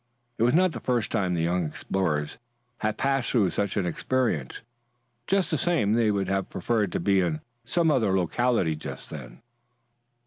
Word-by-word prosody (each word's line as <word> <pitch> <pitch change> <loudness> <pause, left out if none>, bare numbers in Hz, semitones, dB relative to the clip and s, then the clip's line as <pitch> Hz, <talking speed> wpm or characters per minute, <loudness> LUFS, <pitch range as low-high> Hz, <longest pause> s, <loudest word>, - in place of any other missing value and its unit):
It - - -2
was 120 +4 +4
not 185 +1 +4
the - - -6
first 120 -4 -1
time 90 -3 0
the 80 - 0
young 90 +1 +1
explorers 75 -1 -2 0.4
had 110 0 -1
passed 135 -2 0
through 105 -8 +2
such 100 0 -1
an 100 - +1
experience. 90 - -1 0.6
Just 195 -1 +1
the - - +1
same 115 -13 +2
they 115 -1 +3
would 100 -2 0
have 95 0 -1
preferred 105 0 0
to - - 0
be 95 +2 +3
in 80 -4 -1 0.3
some 160 +5 +2
other 110 -9 +2
locality 95 -2 +1
just 75 - -8
then. - - -9
100 Hz, 175 wpm, -26 LUFS, 90-120 Hz, 0.6 s, was